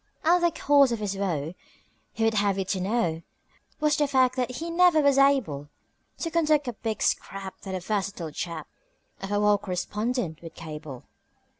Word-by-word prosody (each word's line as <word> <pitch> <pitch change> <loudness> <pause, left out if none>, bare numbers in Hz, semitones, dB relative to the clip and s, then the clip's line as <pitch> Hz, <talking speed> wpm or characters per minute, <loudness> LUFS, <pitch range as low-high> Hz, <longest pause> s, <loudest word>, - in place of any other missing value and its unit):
And 345 +2 +4
the 345 - +5
cause 285 -5 +4
of 235 - 0
his 205 -2 -3
woe, 170 -5 -2 0.6
he 225 - -3
would 225 0 +3
have 200 -2 +1
you 195 - -1
to 190 0 -2
know, 185 -5 0 0.6
Was 300 0 +2
the 295 - +2
fact 260 -2 +3
that 255 -1 -1
he 330 +6 -5
never 350 -1 +5
was 280 -2 +4
able 220 - +2 0.5
To 330 - -2
conduct 305 -4 +2
a 245 - -2
big 220 0 -3
scrap 195 -1 -2
that 190 -1 -5
a - - -2
versatile 195 -4 -3
chap 165 0 -5 0.5
Of 195 - -5
a 205 - +2
war 210 -1 +4
correspondent 200 0 -3
would 165 -1 -10
cable. 150 -5 -8
210 Hz, 180 wpm, -26 LUFS, 180-275 Hz, 0.6 s, the